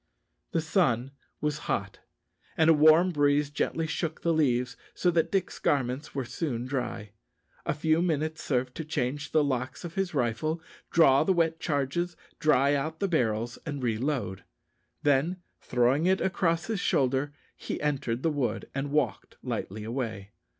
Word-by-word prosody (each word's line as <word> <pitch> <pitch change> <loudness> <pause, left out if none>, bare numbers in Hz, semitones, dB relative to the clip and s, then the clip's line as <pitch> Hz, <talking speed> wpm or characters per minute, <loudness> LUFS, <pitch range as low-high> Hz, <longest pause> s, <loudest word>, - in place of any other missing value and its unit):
The 165 - +1
sun 140 - +1 0.3
was 150 0 -1
hot, 100 -1 -2 0.6
and 160 0 +6
a - - +7
warm 155 +4 +6
breeze 145 -1 +2
gently 160 +2 -1
shook 160 0 -3
the 170 - +2
leaves, 125 -6 +1 0.2
so 180 - +2
that 165 -1 +1
Dick's 195 -2 -1
garments 135 +1 -1
were 135 -2 -1
soon 125 -3 -3
dry. 125 -6 -3 0.6
A - - +1
few 160 +2 +2
minutes 155 -2 -1
served 125 -2 0
to 160 - -3
change 145 -2 -2
the 155 - +4
locks 130 +3 -2
of 165 - -6
his 190 -3 -2
rifle, 135 +6 0 0.3
draw 145 -4 +5
the 190 - +3
wet 165 -2 +1
charges, 160 +3 -1 0.2
dry 140 -2 +4
out 155 +3 -2
the 200 - +1
barrels, 120 - 0
and 145 -4 -5
re 110 -3 0
load. 120 -8 -2 0.6
Then 145 +5 +2 0.2
throwing 125 +7 +2
it 190 0 +3
across 170 -3 +1
his 220 -3 -2
shoulder, 135 -2 +1 0.2
he - - -5
entered 135 -5 -1
the 165 - +2
wood 140 -4 -2
and 135 +1 -2
walked 140 -9 -1
lightly 105 +3 -4
away. 110 -4 -4
145 Hz, 160 wpm, -28 LUFS, 125-160 Hz, 0.6 s, a